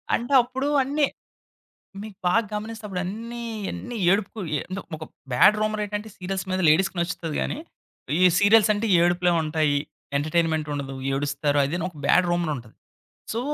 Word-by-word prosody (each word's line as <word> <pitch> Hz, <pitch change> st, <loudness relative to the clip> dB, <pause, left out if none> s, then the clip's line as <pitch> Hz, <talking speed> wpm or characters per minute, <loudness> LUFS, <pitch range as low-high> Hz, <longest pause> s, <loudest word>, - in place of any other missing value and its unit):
అంటే 240 Hz, +4 st, -3 dB
అప్పుడు 260 Hz, +3 st, -3 dB, 0.2 s
అన్ని 290 Hz, +3 st, +1 dB, 1.0 s
మీకు 215 Hz, -2 st, -9 dB
బాగ 180 Hz, +6 st, +4 dB
గమనిస్తే 215 Hz, +1 st, -5 dB
అప్పుడన్ని 215 Hz, +6 st, -5 dB, 0.3 s
అన్ని 245 Hz, -1 st, -6 dB
ఏడుపుకు 205 Hz, +2 st, 0 dB, 0.6 s
ఒక 155 Hz, -, -7 dB, 0.3 s
బ్యాడ్ 125 Hz, +12 st, +6 dB
రూమర్ 215 Hz, 0 st, 0 dB
ఏంటంటే 210 Hz, +1 st, -5 dB
సీరియల్స్ 190 Hz, 0 st, -4 dB
మీద 185 Hz, 0 st, 0 dB
లేడీస్‌కి 185 Hz, +5 st, +3 dB
నచ్చుతది 170 Hz, -2 st, -3 dB
గాని, -, -, -2 dB, 0.6 s
ఈ -, -, 0 dB, 0.2 s
సీరియల్స్ 210 Hz, 0 st, +5 dB
అంటే 210 Hz, +2 st, -1 dB, 0.2 s
ఏడుపులే 175 Hz, 0 st, +2 dB
ఉంటాయి, 155 Hz, -2 st, +1 dB, 0.4 s
ఎంటర్‌టైన్‌మేం‌ట్ 155 Hz, 0 st, 0 dB
ఉండదు 135 Hz, -1 st, -4 dB, 0.2 s
ఏడుస్తారు 145 Hz, +1 st, 0 dB
అదేను 165 Hz, +5 st, -2 dB
ఒక 175 Hz, -, -15 dB
బ్యాడ్ 180 Hz, -, +4 dB
రూమర్ 175 Hz, -2 st, 0 dB
ఉంటది. 115 Hz, -3 st, -12 dB, 0.6 s
సో, 225 Hz, -, -1 dB
185 Hz, 140 wpm, -24 LUFS, 155-215 Hz, 1.0 s, బ్యాడ్